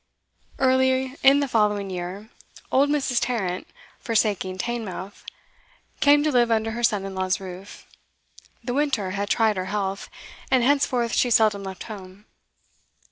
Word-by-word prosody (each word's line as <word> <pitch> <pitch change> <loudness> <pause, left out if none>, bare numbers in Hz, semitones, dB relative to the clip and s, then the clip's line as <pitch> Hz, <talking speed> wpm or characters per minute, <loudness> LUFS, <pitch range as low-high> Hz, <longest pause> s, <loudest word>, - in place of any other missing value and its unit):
Early 260 0 +2
in 275 +1 +6
the 280 - 0
following 210 -4 +1
year, 185 +4 -6 0.4
old 280 +2 +3
Mrs. 270 -4 +1
Tarrant, 190 -7 -2 0.3
forsaking 205 -5 0
Teignmouth, 205 -3 -5 0.8
came 290 0 +5
to 305 - +1
live 240 -3 +3
under 225 0 +1
her 235 +2 -4
son 210 -4 +1
in 195 - -6
law's 185 0 -1
roof; 190 +1 -10 0.8
the 245 +1 -3
winter 265 -9 0
had 200 +1 -3
tried 220 -3 +2
her 185 - -2
health, 195 0 -3 0.4
and 255 -2 +3
henceforth 250 -4 +1
she 250 - +2
seldom 215 -3 +3
left 190 -1 -7
home. 200 -1 -10
220 Hz, 140 wpm, -24 LUFS, 195-255 Hz, 0.8 s, in